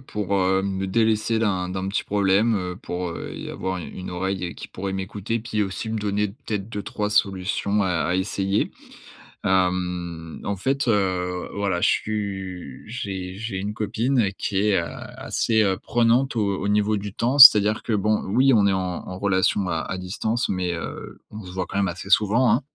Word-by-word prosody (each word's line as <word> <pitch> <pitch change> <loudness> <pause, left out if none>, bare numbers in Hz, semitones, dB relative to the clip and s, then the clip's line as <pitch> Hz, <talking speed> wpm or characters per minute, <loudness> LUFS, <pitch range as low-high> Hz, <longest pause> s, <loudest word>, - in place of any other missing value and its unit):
pour, 105 -1 -2
heu, 95 0 +2
me 95 0 -2
délaisser 110 +2 +1
d'un 95 -5 0
d'un 95 +1 -3
petit 100 - -1
problème. 100 +3 +2
Heu, 90 -3 -3
pour, 90 -1 -4
heu, - - -6
y - - -7
avoir 95 0 -3
u 85 - -6
une 90 - -7
oreille 95 +1 -2
et 85 - -5
qui - - -9
pourrait 95 +1 -5
m'écouter, 100 +4 -3
puis 110 -2 -2
aussi 100 +3 -4
me 110 - -2
donner 105 0 0
peut-être 105 -2 -5
2-3 105 -1 -3
solutions 100 +1 +1
à 95 - 0 0.2
à 90 - +1
essayer. 95 +1 0 0.7
Hem, 90 -3 -1
en 100 - -2
fait, 135 +7 0
heu, 90 -4 0
voilà 100 -3 -1
je - - +4
suis 95 -9 -3
j'ai 95 -5 -5
j'ai 115 -3 -4
une 100 +2 -3
copine 110 +2 0
qui 100 - -2
est, 100 - +3
heu, 85 - -2 0.3
assez, 110 -1 +1
heu, 95 -2 +2
prenante 120 +3 +2
au 100 -3 0
au 100 - -1
niveau 105 +1 +2
du 100 0 -6
temps. 125 +5 0
C'est-à-dire 110 -6 +9
que, 115 - -2
bon 105 +1 +1
oui 130 +7 +4
on 105 -3 +5
est 100 - +2
en 95 - +1 0.3
en 90 - -6
relation 95 0 +1
à 85 -2 0
à 95 - -4
distance, 110 +6 -2
mais, 90 -2 -1
heu, 85 - -7
on 105 0 -8
se 90 - -9
voit 90 0 -3
quand 95 - -5
même 100 -1 +2
assez 95 +3 -6
souvent, 110 +5 +4
hein. 125 - +2
100 Hz, 195 wpm, -24 LUFS, 95-110 Hz, 0.7 s, C'est-à-dire